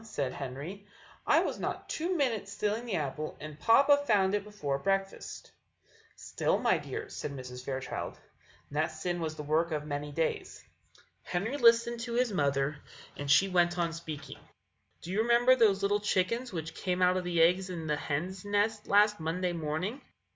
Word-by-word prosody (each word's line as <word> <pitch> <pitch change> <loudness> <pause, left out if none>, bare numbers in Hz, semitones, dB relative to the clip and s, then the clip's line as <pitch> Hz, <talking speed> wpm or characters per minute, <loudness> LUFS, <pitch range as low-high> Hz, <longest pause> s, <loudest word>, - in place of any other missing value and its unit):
said 140 -12 -3
Henry; 145 +9 -6 0.4
"I - - +5
was - - -2
not - - -4
two 345 +3 -1
minutes 230 -8 0
stealing 210 +3 -2
the 210 - -1
apple, 155 -1 -3
and 155 0 -9
papa 280 - +6
found 195 -3 +3
it 205 - +3
out - - -13
before 150 -10 -3
breakfast." 195 +3 -2 0.6
"Still, - - -1
my - - +2
dear," 430 0 -6
said 275 - -5
Mrs. 125 -2 -8
Fairchild, 130 0 -4 0.5
"that 155 +2 +1
sin 175 +2 -3
was 160 -2 -3
the 150 - -6
work 155 +3 +1
of 150 -1 -2
many 145 0 -4
days." 160 +2 -2 0.6
Henry 210 +10 -2
listened 235 -2 +4
to 235 0 -4
his 240 -2 +1
mother, 140 -2 +1 0.4
and 145 0 -5
she 145 +8 +6
went 175 -1 +2
on 170 -1 0
speaking: 160 -3 -7 0.6
"Do 175 - -6
you 205 +3 +2
remember 240 +2 +5
those 205 -5 +3
little 205 +1 +2
chickens 210 +5 0
which 165 -3 -5
came 180 -1 -1
out 180 0 +4
of 185 - -1
the 175 -1 -1
eggs 180 +3 +4
in 170 -3 -5
the 150 -1 +1
hen's 180 +7 -3
nest 205 +1 0
last 210 +1 +4
Monday 175 +3 -1
morning?" 170 - -3
180 Hz, 175 wpm, -30 LUFS, 155-210 Hz, 0.6 s, papa